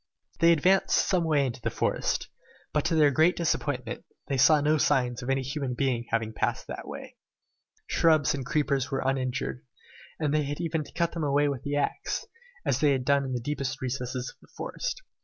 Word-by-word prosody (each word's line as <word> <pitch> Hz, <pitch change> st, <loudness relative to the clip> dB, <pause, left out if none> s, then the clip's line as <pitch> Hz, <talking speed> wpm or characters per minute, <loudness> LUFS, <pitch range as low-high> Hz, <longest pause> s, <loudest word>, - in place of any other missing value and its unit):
They 170 Hz, 0 st, +6 dB
advanced 185 Hz, +4 st, +3 dB
some 180 Hz, -3 st, +2 dB
way 150 Hz, -3 st, +3 dB
into 120 Hz, -1 st, -4 dB
the -, -, -2 dB
wood, -, -, 0 dB, 0.7 s
but 150 Hz, -, +2 dB
to 170 Hz, -, +1 dB
their 150 Hz, -2 st, +5 dB
great 160 Hz, +6 st, +4 dB
disappointment, 170 Hz, -2 st, -2 dB, 0.2 s
they -, -, -4 dB
as 130 Hz, -, +2 dB
yet -, -, +8 dB
saw 155 Hz, +1 st, +6 dB
no 150 Hz, +1 st, +2 dB
signs 125 Hz, -4 st, +1 dB
of 125 Hz, -, -5 dB
any 135 Hz, 0 st, +1 dB
human 135 Hz, -1 st, -3 dB
being 120 Hz, -3 st, 0 dB
having 115 Hz, -1 st, -1 dB
passed -, -, -1 dB
that -, -, -7 dB
way. -, -, -9 dB, 0.7 s
Shrubs 155 Hz, -5 st, +3 dB
and 140 Hz, -2 st, -3 dB
creepers 140 Hz, -1 st, 0 dB
were 135 Hz, -1 st, -1 dB
uninjured, 130 Hz, -1 st, -1 dB, 0.6 s
and 150 Hz, -2 st, 0 dB
they 155 Hz, -, +3 dB
had 145 Hz, +1 st, -4 dB
even 160 Hz, -2 st, -1 dB
to -, -, -14 dB
cut 170 Hz, -1 st, 0 dB
them 165 Hz, -, -4 dB
away 145 Hz, 0 st, +2 dB
with 140 Hz, -3 st, -3 dB
the 145 Hz, 0 st, -3 dB
axe, 145 Hz, -, -1 dB, 0.4 s
as -, -, +1 dB
they 150 Hz, -3 st, +4 dB
had 130 Hz, -2 st, -2 dB
done 140 Hz, 0 st, +3 dB
in 130 Hz, -, -3 dB
the 125 Hz, -, -1 dB
deepest 135 Hz, +1 st, -3 dB
recesses 125 Hz, 0 st, -3 dB
of -, -, -26 dB
the -, -, -19 dB
forest. -, -, -4 dB
140 Hz, 210 wpm, -28 LUFS, 130-155 Hz, 0.7 s, yet